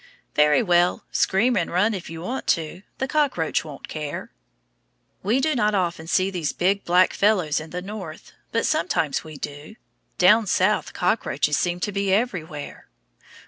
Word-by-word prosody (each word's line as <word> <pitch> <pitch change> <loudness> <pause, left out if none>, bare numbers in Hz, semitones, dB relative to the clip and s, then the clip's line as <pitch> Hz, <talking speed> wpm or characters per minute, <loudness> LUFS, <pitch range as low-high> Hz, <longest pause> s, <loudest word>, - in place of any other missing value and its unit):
Very 150 +7 +4
well, 175 -2 +2
scream 230 +6 +2
and 170 - 0
run 205 +6 +2
if 190 -4 -6
you 165 0 -7
want 255 +8 -4
to; 165 +2 0 0.2
the 265 - -2
cockroach 270 - 0
won't 150 -3 -10
care. 150 -2 -6 0.9
We 220 +7 +1
do 310 +3 +1
not 210 -5 +1
often 170 -4 -1
see 185 +3 +1
these 170 -5 -2
big 195 +3 +1
black 180 +1 +4
fellows 190 -8 +2
in 155 +1 -9
the 180 +1 -5
North, 190 -6 -8 0.2
but 230 - 0
sometimes 160 -4 0
we 155 -2 -10
do. 145 +9 -8 0.4
Down 210 +4 +5
South 190 +3 +1
cockroaches 150 -6 0
seem 175 0 -1
to 205 - -1
be 200 -1 -1
everywhere. 180 -9 -2
180 Hz, 160 wpm, -23 LUFS, 160-210 Hz, 0.9 s, Down